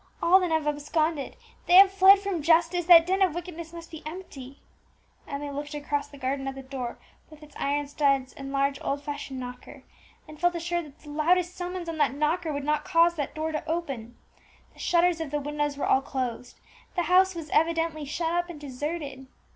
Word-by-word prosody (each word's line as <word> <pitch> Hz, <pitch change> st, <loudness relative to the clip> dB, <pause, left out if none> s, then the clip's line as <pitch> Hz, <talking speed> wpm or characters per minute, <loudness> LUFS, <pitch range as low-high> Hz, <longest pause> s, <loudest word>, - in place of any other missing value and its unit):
All 355 Hz, +3 st, +5 dB
then 365 Hz, -2 st, -1 dB
have 320 Hz, -1 st, +1 dB
absconded, 295 Hz, 0 st, -1 dB, 0.3 s
they 355 Hz, -, +5 dB
have 385 Hz, +1 st, +9 dB
fled 390 Hz, +1 st, +7 dB
from 390 Hz, -4 st, -3 dB
justice; 335 Hz, +2 st, +3 dB
that 335 Hz, -2 st, +9 dB
den 380 Hz, +2 st, 0 dB
of 365 Hz, -4 st, +3 dB
wickedness 340 Hz, -2 st, -7 dB
must 335 Hz, -1 st, -10 dB
be 320 Hz, -, -8 dB
empty." 290 Hz, -5 st, -9 dB, 0.7 s
Emmie 285 Hz, 0 st, -5 dB
looked 290 Hz, +2 st, -6 dB
across 290 Hz, -1 st, -2 dB
the 290 Hz, 0 st, -14 dB
garden 270 Hz, +1 st, -2 dB
at 270 Hz, -, -4 dB
the 270 Hz, -, -8 dB
door 260 Hz, -3 st, -5 dB, 0.3 s
with 310 Hz, -1 st, -15 dB
its 300 Hz, -, -16 dB
iron 290 Hz, +1 st, -1 dB
studs 275 Hz, -3 st, +1 dB
and 275 Hz, 0 st, -8 dB
large 275 Hz, 0 st, 0 dB
old 280 Hz, +1 st, -2 dB
fashioned 285 Hz, -2 st, -5 dB
knocker, 250 Hz, 0 st, -9 dB, 0.4 s
and 305 Hz, 0 st, -13 dB
felt 350 Hz, 0 st, +2 dB
assured 345 Hz, 0 st, -2 dB
that 290 Hz, 0 st, -16 dB
the 300 Hz, -, -13 dB
loudest 350 Hz, +4 st, +1 dB
summons 360 Hz, -1 st, -5 dB
on 325 Hz, -1 st, -5 dB
that 275 Hz, -, +2 dB
knocker 315 Hz, +3 st, 0 dB
would 285 Hz, -1 st, -3 dB
not 300 Hz, +1 st, 0 dB
cause 335 Hz, +1 st, +4 dB
that 290 Hz, -5 st, -4 dB
door 315 Hz, +1 st, -2 dB
to 305 Hz, -, -3 dB
open. 270 Hz, -9 st, -4 dB, 0.6 s
The -, -, -20 dB
shutters 345 Hz, -1 st, +2 dB
of 320 Hz, -, -4 dB
the 295 Hz, +1 st, -1 dB
windows 295 Hz, 0 st, -2 dB
were -, -, -1 dB
all 265 Hz, -, +3 dB
closed, 250 Hz, -3 st, -5 dB, 0.4 s
the 350 Hz, -, +1 dB
house 370 Hz, +1 st, +4 dB
was 320 Hz, -3 st, -7 dB
evidently 325 Hz, -1 st, +1 dB
shut 330 Hz, +3 st, -2 dB
up 350 Hz, 0 st, 0 dB
and 330 Hz, -4 st, -8 dB
deserted. 280 Hz, -1 st, -5 dB
305 Hz, 205 wpm, -27 LUFS, 280-340 Hz, 0.7 s, have